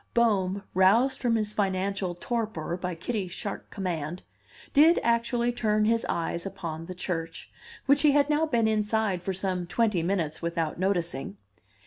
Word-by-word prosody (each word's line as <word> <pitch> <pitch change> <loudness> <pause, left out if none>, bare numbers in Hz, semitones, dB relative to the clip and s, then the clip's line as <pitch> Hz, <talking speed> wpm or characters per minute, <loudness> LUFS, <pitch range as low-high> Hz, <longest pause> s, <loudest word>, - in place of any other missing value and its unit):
Bohm, 200 -4 +2
roused 215 +9 +4
from 235 -2 +1
his 215 -1 -1
financial 195 -2 -1
torpor 215 -5 -3
by 180 -1 -4
Kitty's 185 +1 -3
sharp 200 - -5
command, 175 -4 -4 0.5
did 315 +3 +6
actually 235 +1 +1
turn 215 -3 +1
his 230 +1 +1
eyes 170 0 -2
upon 165 -4 -6
the 185 - -6
church, 170 -2 -4 0.3
which 280 +1 +4
he 295 -1 +5
had 285 0 +4
now 305 +1 +2
been 235 -6 +2
inside 215 -3 0
for 190 - -2
some 185 -1 -2
twenty 210 0 +1
minutes 170 -3 -1
without 165 -1 -2
noticing. 170 - -1
195 Hz, 150 wpm, -27 LUFS, 175-230 Hz, 0.5 s, did